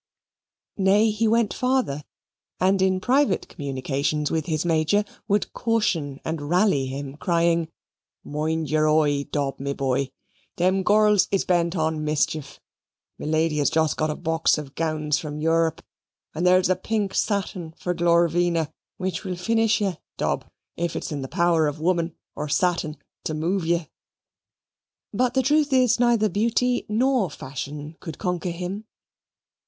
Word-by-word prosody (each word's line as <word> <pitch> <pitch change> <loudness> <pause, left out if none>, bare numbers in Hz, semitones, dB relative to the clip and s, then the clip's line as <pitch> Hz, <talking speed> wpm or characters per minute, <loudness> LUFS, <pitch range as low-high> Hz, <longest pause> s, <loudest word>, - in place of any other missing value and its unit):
Nay, 205 +3 +4
he 220 +2 +1
went 225 -1 +2
farther, 250 - 0 0.6
and 190 +1 +3
in 190 0 +2
private 250 -2 +2
communications 140 +2 -2
with 160 -2 -1
his 155 0 -1
Major 165 +5 +2 0.2
would 205 -1 0
caution 175 - 0
and 160 -1 -3
rally 175 -7 +3
him, 135 +1 -6
crying, 170 0 +1 0.6
"Mind 155 +1 -2
your 155 0 +2
oi, 145 -2 +2
Dob, 140 -2 -2
my 140 +1 -2
boy, 135 0 -1 0.5
them 185 +2 +2
girls 210 0 +4
is 195 - 0
bent 175 0 +1
on 160 -2 0
mischief 150 -1 -1 0.6
me - - -5
Lady 155 0 +1
has 145 - +3
just 160 -1 +1
got 155 0 0
a 150 - -2
box 160 -1 +1
of 145 -2 -7
gowns 155 -2 0
from 150 -1 -6
Europe, 165 0 +1 0.5
and 170 +3 0
there's 185 0 +5
a - - +3
pink 200 +1 -2
satin 190 -5 -1
for 180 - -2
Glorvina, 170 -1 +2 0.2
which 185 0 -3
will 185 -2 -3
finish 225 +4 +1
ye, 190 -5 0 0.2
Dob, - - -1 0.3
if 170 -1 -2
it's - - -4
in 145 -2 -3
the 135 - -4
power 170 -1 +2
of 145 +1 -4
woman 170 0 0 0.2
or 150 0 -5
satin 165 -2 0 0.3
to 155 - -2
move 165 +3 -1
ye." 170 -1 +1 1.3
But 250 0 +1
the 265 - +3
truth 295 +2 +2
is, 250 -2 +4
neither 235 -3 +3
beauty 235 +5 +1
nor 240 -2 +2
fashion 145 +3 -7
could 160 -3 -7
conquer 180 -1 -2
him. 180 +5 -5
170 Hz, 150 wpm, -24 LUFS, 155-200 Hz, 1.3 s, there's